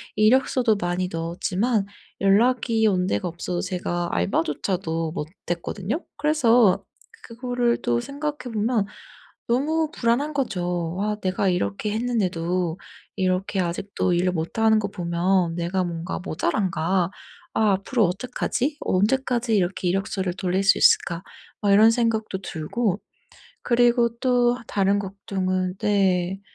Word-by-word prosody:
이력서도 245 +1 +3
많이 175 +1 -1
넣었지만 185 +6 -1 0.4
연락이 225 +2 +3
온 185 -2 +1
데가 100 +12 -1
없어서 175 +1 -4
제가 175 -2 -2
알바조차도 160 - -1
못 150 - -4 0.2
했거든요. 190 - -3
그래서 245 -9 +4 0.4
그거를 245 0 -1
또 120 0 +1
생각해 285 -4 -5
보면 215 -1 +1 0.7
너무 310 +5 +1
불안한 275 +5 0
거죠. 180 - -2
아 210 0 0
내가 190 +1 0
이렇게 175 - -1
했는데도 185 -7 -1 0.4
이렇게 185 +1 0
아직도 180 +1 -1
일을 180 +1 +2
못 165 +5 -4
하는 220 -1 +4
거 200 - -2
보면 175 -1 0
'내가 180 +2 -1
뭔가 170 +1 -4
모자란가. 180 0 0 0.4
아 215 -2 +3
앞으로 210 +4 +1
어떡하지? 250 - -2
어 - - 0
언제까지 240 +1 +1
이렇게 180 -1 0
이력서를 190 -1 -1
돌릴 190 0 0
수 195 - +5
있을까.' 170 +1 +4 0.4
막 200 -1 +3
이런 215 +3 +7
생각도 225 -4 0
들고 190 +5 -2 0.6
그리고 240 0 +3
또 245 -1 +2
다른 200 0 +2
걱정은 185 -2 -2
네. 190 -2 +1
195 Hz, 285 characters per minute, -24 LUFS, 180-235 Hz, 0.7 s, 이런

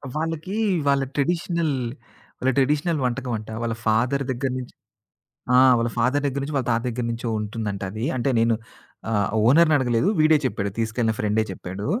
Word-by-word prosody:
వాళ్ళకి 165 +4 -3 0.3
వాళ్ళ 140 -1 +3
ట్రెడిషనల్ 165 +1 0 0.7
వాళ్ళ 130 - +2
ట్రెడిషనల్ 150 +4 +2
వంటకం 125 0 -2
అంట. 110 +1 -10
వాళ్ళ 115 -1 -1
ఫాదర్ 125 +6 +2
దగ్గర 130 +1 -2
నుంచి 125 - -9 0.8
ఆ! - - +7 0.2
వాళ్ళ 115 0 0
ఫాదర్ 130 +4 +1
దగ్గర 140 0 -2
నుంచి 145 +2 -4
వాళ్ళ 130 -3 -1
తాత 115 -1 +2
దగ్గర 120 0 -3
నుంచో 115 +1 -3
ఉంటుందంటది. 105 -1 -4
అంటే 130 +2 0
నేను 115 0 +3 0.6
ఆహ్, 105 -3 +1 0.2
ఓనర్‌ని 155 +5 +5
అడగలేదు 125 +4 +1
వీడే 155 0 +6
చెప్పాడు 100 -6 -1
తీసుకెళ్ళిన 115 0 0
ఫ్రెండే 105 +1 +1
చెప్పాడు. 95 +2 -6
125 Hz, 155 wpm, -23 LUFS, 115-145 Hz, 0.8 s, ఆ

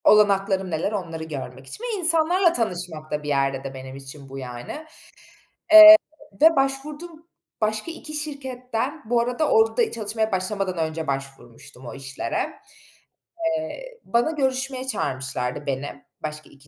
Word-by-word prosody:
Olanaklarım 195 -2 +4
neler, 160 +5 -1
onları 165 -6 -4
görmek 135 -4 -7
için 445 - -8
ve 460 -5 -2
insanlarla 340 +1 +3
tanışmak 180 - -3
da 150 0 -2
bir - - -7
yerde 135 -1 0
de 135 0 -6
benim 130 0 -9
için 135 0 -11
bu 135 - -8
yani, 125 - -7 0.9
eee, 320 0 +13 0.5
ve 325 +1 +7
başvurduğum 300 +5 -2 0.3
başka 215 +8 -1
2 315 -2 -9
şirketten, 275 -2 -4
-bu 240 -1 +3
arada 250 +6 -1
orada 450 0 +3
çalışmaya 220 0 -2
başlamadan 190 0 -2
önce 160 0 -2
başvurmuştum 135 -1 -7
o 120 - -7
işlere 135 0 -4 1.1
eee, - - -8
bana 240 +6 +1
görüşmeye 265 -2 -2
çağırmışlardı 135 - -3
beni 140 +1 -4 0.2
başka 155 0 -6
2 140 +1 -20
200 Hz, 135 wpm, -24 LUFS, -, 1.1 s, eee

